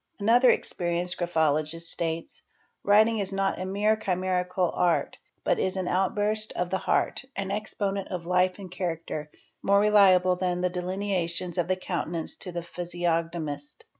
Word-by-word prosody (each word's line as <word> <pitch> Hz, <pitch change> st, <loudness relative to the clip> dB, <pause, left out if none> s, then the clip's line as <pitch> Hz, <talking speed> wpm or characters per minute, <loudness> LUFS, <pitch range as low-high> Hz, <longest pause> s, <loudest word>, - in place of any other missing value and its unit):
Another 240 Hz, +5 st, +5 dB
experienced 175 Hz, -3 st, -1 dB
graphologist 160 Hz, -1 st, 0 dB
states.—'' 165 Hz, -1 st, -3 dB, 0.4 s
Writing 215 Hz, +2 st, +4 dB
is 195 Hz, -1 st, -1 dB
not 195 Hz, -1 st, 0 dB
a 185 Hz, -, -3 dB
mere 205 Hz, +3 st, +2 dB
chimerical 185 Hz, -2 st, 0 dB
art, 175 Hz, -1 st, +1 dB, 0.2 s
but -, -, +1 dB
is 190 Hz, +1 st, 0 dB
an 185 Hz, -1 st, -2 dB
outburst 210 Hz, +3 st, 0 dB
of 180 Hz, 0 st, -2 dB
the 190 Hz, -, +1 dB
heart, -, -, 0 dB
an 195 Hz, -1 st, -3 dB
exponent 200 Hz, -1 st, -2 dB
of 180 Hz, -2 st, -5 dB
life 180 Hz, +1 st, +2 dB
and 190 Hz, -3 st, -9 dB
character, 165 Hz, -4 st, -4 dB, 0.3 s
more 200 Hz, 0 st, +4 dB
reliable 190 Hz, -3 st, +5 dB
than 180 Hz, -1 st, -1 dB
the 180 Hz, 0 st, +1 dB
delinea: 185 Hz, 0 st, -1 dB
tions 175 Hz, +1 st, -4 dB
of 170 Hz, -, +1 dB
the 185 Hz, -, +2 dB
countenance 175 Hz, -3 st, -3 dB
to 180 Hz, -, -7 dB
the 170 Hz, -1 st, -4 dB
physiognomist." 175 Hz, -, -3 dB
180 Hz, 155 wpm, -27 LUFS, 175-200 Hz, 0.4 s, Another